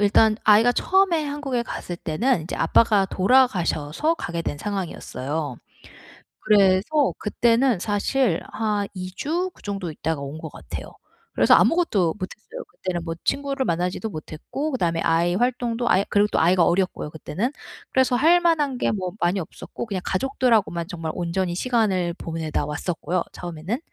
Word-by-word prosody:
일단 215 +1 +4
아이가 220 +3 +5
처음에 370 +1 +2
한국에 285 -4 -2
갔을 175 -6 -6
때는 180 +6 0
인제 165 - -5
아빠가 205 +4 +4
돌아가셔서 195 - +2
가게 170 - -4
된 145 - -4
상황이었어요. 160 - -4 0.8
그래서 210 +8 +3
그때는 230 +1 +2
사실 205 0 +1
한 210 -2 -1
2 185 -1 -6
주 350 +5 -1
그 - - -21
정도 195 -4 -4
있다가 155 0 -3
온 140 +2 -6
것 - - -7
같아요. - - -7 0.5
그래서 - - +5
아무것도 210 - +3
못 185 - -3
했어요. 480 - -10
그때는 180 - -4
뭐 165 -1 -3
친구를 275 -1 -1
만나지도 180 +5 -1
못했고 190 - -5
그다음에 170 -9 0
아이 170 +2 +2
활동도 240 0 0
아예 190 -1 +3
그리고 205 0 +3
또 - - +2
아이가 175 +1 +4
어렸고요 180 -3 0
그때는. 185 - -3 0.4
그래서 260 -1 +3
할 330 +7 +5
만한 300 -6 +1
게 - - +1
뭐 185 -4 -3
많이 175 +3 +1
없었고 175 +6 -7
그냥 195 -4 -3
가족들하고만 220 -6 +1
정말 165 -4 -4
온전히 175 +1 -1
시간을 190 -6 +1
보내다 160 -4 -3
왔었고요 165 +3 -2
처음에는. 175 +6 -4
200 Hz, 365 characters per minute, -23 LUFS, 170-250 Hz, 0.8 s, 아이가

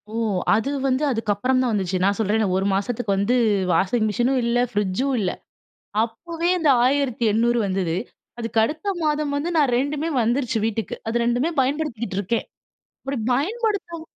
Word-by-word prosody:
ஓ! - - -2 0.4
அது 225 +6 0 0.2
வந்து 260 +3 +1
அதுக்கு 225 -3 -1
அப்புறம் 255 +5 +1
தான் 250 -3 +1
வந்துச்சு. 190 -2 0
நான் 200 +1 +2
சொல்றேனே! 215 +1 +1
ஒரு 195 - 0
மாசத்துக்கு 205 +1 -1
வந்து 200 +6 +1 0.4
வாஷிங் 195 +7 +2
மிஷினும் 250 +5 +1
இல்ல. 235 +1 +1
ஃப்ரிட்ஜும் 210 +6 0
இல்ல. 185 -3 0 0.7
அப்பவே 330 +9 -3
அந்த 315 -4 +3
1800 240 -4 +2
வந்தது. 185 -3 -1 0.4
அதுக்கு 230 -1 -2
அடுத்த 310 - -5 0.2
மாதம் 300 -2 0
வந்து 315 +5 -2
நான் 280 -5 +3
2மே 290 +4 -1
வந்துருச்சு 240 0 0
வீட்டுக்கு. 225 -2 -3
அது 235 +1 0
2மே 245 +7 +1
பயன்படுத்திக்கிட்டு 255 -8 -2
இருக்கேன். 225 +4 -1 0.6
அப்பிடி 270 -1 -3 0.2
பயன்படுத்தவும் 380 - -1
240 Hz, 150 wpm, -23 LUFS, 215-285 Hz, 0.7 s, அந்த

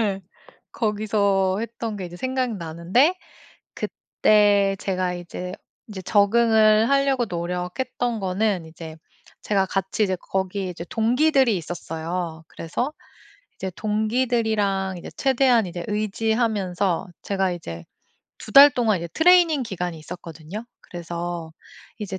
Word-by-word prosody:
예. 200 -3 0 0.5
거기서 200 -3 +1
했던 230 -1 -5
게 190 - -5
이제 175 0 -9
생각나는데 235 - +1 0.6
그때 205 -2 +2
제가 185 -2 -1
이제 180 +1 -6 0.4
인제 205 -4 -7
적응을 215 +2 +4
하려고 275 -3 +2
노력했던 180 +7 -3
거는 190 -1 0
이제 160 0 -10 0.4
제가 195 -2 +1
같이 195 +3 -1
이제 190 -2 +1
거기에 190 +1 -3
이제 175 -1 -7
동기들이 250 +1 +3
있었어요. 165 0 -5
그래서 205 - -3 0.7
이제 190 - -4
동기들이랑 215 -3 0
이제 - - -9
최대한 260 -4 +3
이제 175 -1 -6
의지하면서 210 -4 0
제가 195 -2 0
이제 85 - -7 0.5
2 - - -10
달 280 +5 +10
동안 225 -7 +1
이제 170 - -5
트레이닝 335 -4 +5
기간이 180 -6 -4
있었거든요. 170 +4 -8 0.2
그래서 170 -1 -6 0.5
이제 195 -3 -5
200 Hz, 280 characters per minute, -23 LUFS, 180-225 Hz, 0.7 s, 달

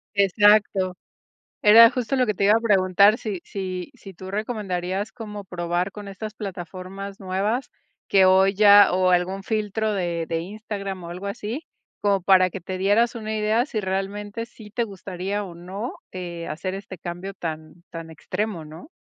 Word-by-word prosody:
Exacto. 200 -1 +3 0.7
Era 230 +2 +9
justo 250 +1 -2
lo 255 - +3
que 210 - +1
te 200 - 0
iba 205 +2 +6
a 225 - +3
preguntar. 200 0 +4
Si, 205 -6 -4
si, 185 +1 -5
si 195 -6 -12
tú 185 +2 -9
recomendarías 200 -2 -3
como 210 -4 -8
probar 175 +1 -2
con 205 -1 -9
estas 210 +2 -6
plataformas 195 +1 -7
nuevas 200 +7 -1 0.4
que 195 -1 +5
hoy 190 +1 +5
ya 205 -1 +7
o 185 0 +3
algún 180 +2 +1
filtro 215 0 -1
de 170 -4 -1
de 165 0 -2
Instagram 200 -1 -6
o 170 - -7
algo 180 +3 -6
así, 225 +8 -5 0.3
como 200 -2 +2
para 185 0 +5
que 195 - -7
te 185 +2 -5
dieras 210 +5 +3
una 220 -1 -4
idea 215 +4 +1
si 220 -7 -3
realmente 205 +3 -3
sí 220 -3 -14
te 235 +2 -1
gustaría 195 0 -4
o 180 -3 -9
no, 190 +7 -6 0.2
eh, 175 -2 -6
hacer 185 +5 -4
este 195 -1 -8
cambio 180 +3 -6
tan 160 0 -7
tan 165 -1 -8
extremo, 180 +2 -4
¿no? 155 - -11
195 Hz, 170 wpm, -24 LUFS, 185-210 Hz, 0.7 s, Era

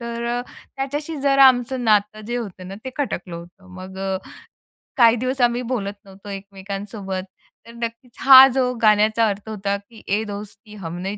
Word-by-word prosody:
तर 235 0 -5
अ, - - -1 0.4
त्याच्याशी 290 +4 -4
जरा 275 0 +5
आमचं 250 0 0
नातं 210 -1 +2
जे 240 +1 -2
होतं 190 -6 -7
ना, 195 - -7
ते 260 - -4
खटकलं 180 -11 -3
होतं. 175 +3 -13
मग 190 0 -9
अ, 195 0 -2 0.8
काही 235 -2 +6
दिवस 255 +2 -2
आम्ही 240 0 +2
बोलत 230 -5 -3
नव्हतो 195 +1 -13
एकमेकांसोबत, 195 0 -6 0.4
तर - - -11
नक्कीच 235 +1 -7
हा 265 0 +10
जो 250 -1 +1
गाण्याचा 215 +1 +4
अर्थ 200 +1 -5
होता 200 -2 -2
की 210 +3 -17
"ए 210 +3 +1
दोस्ती 205 0 -9
हम 175 -4 -7
नहीं 195 +3 -4
215 Hz, 170 wpm, -21 LUFS, 195-245 Hz, 0.8 s, हा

